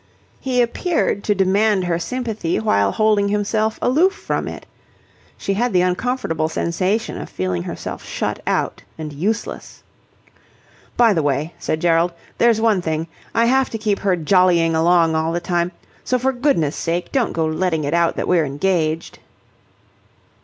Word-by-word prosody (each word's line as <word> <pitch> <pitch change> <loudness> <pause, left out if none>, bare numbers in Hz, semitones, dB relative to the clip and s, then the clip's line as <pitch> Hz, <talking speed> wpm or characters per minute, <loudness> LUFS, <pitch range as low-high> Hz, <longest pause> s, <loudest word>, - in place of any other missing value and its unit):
He 250 -2 +1
appeared 240 - -1
to 210 - +2
demand 195 +1 +2
her 170 -1 0
sympathy 220 -5 -2
while 100 - +2
holding 215 -2 +2
himself 215 +1 0
aloof 330 +10 +3
from - - -3
it. - - -7 0.7
She 200 - -2
had 235 +3 0
the 180 - +4
uncomfortable 180 -4 -1
sensation 185 +7 -1
of - - -8
feeling 90 -1 -2
herself - - -6
shut - - -3
out - - -1 0.2
and 155 -2 -6
useless. 205 +10 -4 1.1
"By 235 -3 +5
the 165 - +1
way," 145 +3 -1
said 155 - -2
Gerald, 170 0 +2 0.3
"there's 235 -2 +4
one 220 -4 +2
thing. 160 0 -2 0.3
I 230 0 +4
have 265 +2 +2
to 225 - -4
keep 210 -2 -1
her 195 -2 +1
jollying 175 -1 +3
along 165 0 +3
all 160 +1 0
the 170 - -1
time, 175 0 -1 0.3
so 255 - +1
for 265 +2 0
goodness' 245 - +1
sake 170 +1 -2
don't 260 -5 +1
go 160 -1 0
letting 160 0 0
it 145 +2 -2
out 170 -1 +2
that - - -3
we're 175 -3 +3
engaged." 160 +2 -1
180 Hz, 160 wpm, -20 LUFS, 165-220 Hz, 1.1 s, By